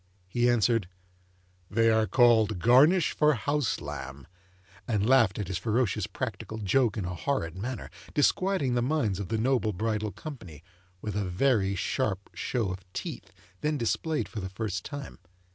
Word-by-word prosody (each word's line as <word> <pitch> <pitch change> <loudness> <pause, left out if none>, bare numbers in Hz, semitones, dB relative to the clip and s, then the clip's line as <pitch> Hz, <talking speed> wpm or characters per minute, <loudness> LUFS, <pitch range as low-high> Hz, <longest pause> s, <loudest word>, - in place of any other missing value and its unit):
he 120 +6 +2
answered, 115 -4 +2 0.8
'They 115 +1 +3
are 110 -1 +3
called 110 -4 +4
Garnish 140 - +5
for 150 -1 +4
house 145 +1 0
lamb,' 70 0 -7 0.6
and 105 -2 +1
laughed 120 -7 +4
at 105 - -3
his 95 -1 -3
ferocious 115 0 0
practical 110 - -5
joke 115 +2 +1
in 100 - -2
a 90 - -3
horrid 90 - -2
manner, 120 +6 -5 0.3
disquieting 150 -2 +2
the 120 - +1
minds 120 - 0
of 100 - -4
the 110 - -1
noble 115 -2 +1
bridal 110 +1 -1
company, 90 - -9 0.4
with 105 -2 -4
a 105 -1 0
very 100 +1 +1
sharp 100 0 -2
show 115 -7 -2
of 95 - -5
teeth, - - -6 0.3
then 150 0 0
displayed 150 +6 -1
for 110 - -6
the 95 -1 -5
first 95 0 -4
time. 145 -2 -7
110 Hz, 160 wpm, -28 LUFS, 100-130 Hz, 0.8 s, Garnish